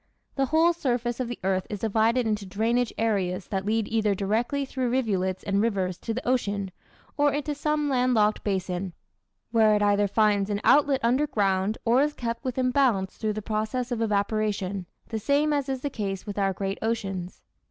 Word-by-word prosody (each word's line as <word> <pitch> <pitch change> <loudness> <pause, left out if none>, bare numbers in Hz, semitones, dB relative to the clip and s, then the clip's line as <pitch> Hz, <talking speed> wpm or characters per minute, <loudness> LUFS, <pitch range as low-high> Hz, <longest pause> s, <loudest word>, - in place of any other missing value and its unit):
The 270 -1 0
whole 325 +4 +4
surface 245 -6 -1
of 255 - -1
the 240 - -5
earth 190 -1 0
is 205 -2 -5
divided 225 +3 +2
into 210 -2 -1
drainage 225 +5 0
areas 195 -5 0
that 195 0 -2
lead 220 0 +1
either 215 -3 +1
directly 230 +8 0
through 260 -2 -2
rivulets 195 -7 0
and 200 0 +1
rivers 190 -5 -1
to 230 - -4
the 245 +3 -4
ocean, 205 -6 0 0.5
or 290 0 +4
into 295 +1 -2
some 300 +1 0
land 255 -2 +2
locked 210 -1 +2
basin, 185 -2 -2 0.6
where 220 -2 +4
it 210 - +1
either 205 0 +3
finds 205 -1 +2
an 205 -1 -1
outlet 285 -2 +4
under 255 +6 +2
ground 195 -2 0
or 240 +3 +4
is 295 +1 +1
kept 235 0 -4
within 255 -1 0
bounds 235 -9 +2
through 215 -1 -1
the 215 0 -5
process 220 +4 -2
of 235 -2 -1
evaporation, 205 -3 -1 0.2
the 225 - -2
same 285 +7 +2
as 285 -2 -1
is 265 -1 -2
the 285 - -2
case 195 -5 -4
with 205 -1 -4
our 195 -1 +2
great 195 +1 -3
oceans. 195 -5 -3
220 Hz, 190 wpm, -26 LUFS, 200-255 Hz, 0.6 s, whole